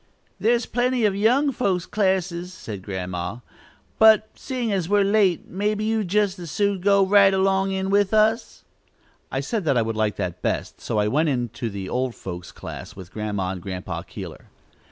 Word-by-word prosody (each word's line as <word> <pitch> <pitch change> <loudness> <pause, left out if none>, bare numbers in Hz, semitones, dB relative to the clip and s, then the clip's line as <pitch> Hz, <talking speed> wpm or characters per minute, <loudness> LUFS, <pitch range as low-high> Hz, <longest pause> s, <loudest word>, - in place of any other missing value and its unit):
"There's 235 +1 +2
plenty 245 0 +1
of 200 -2 +2
young 250 +8 +3
folks' 190 -9 0
classes," 185 -3 0
said 110 - -8
Grandma; 95 +2 -4 0.6
"but 220 -1 +6
seein' 250 -4 -3
as 185 -4 -1
we're 205 0 +4
late 195 -3 +2
maybe 210 +3 -1
you'd 220 -2 0
jest 200 0 +1
as 170 -2 -7
soon 200 +1 0
go 200 0 +4
right 200 0 +6
along 195 0 +2
in 190 0 -2
with 200 -1 +3
us." 220 +2 +1 0.7
I - - -1
said 225 -5 -2
that 135 -5 +2
I 115 - +3
should 115 0 -3
like 110 -2 0
that 90 0 -4
best, - - -2
so - - -2
I 105 0 +2
went 150 +8 +2
into 120 -3 -2
the 100 -2 -6
"old 125 +1 -2
folks'" 90 -1 -7
class - - -9
with 95 -1 -11
Grandma 105 -3 -2
and 95 -2 -6
Grandpa 95 0 -5
Keeler. - - -9
190 Hz, 180 wpm, -23 LUFS, -, 0.7 s, but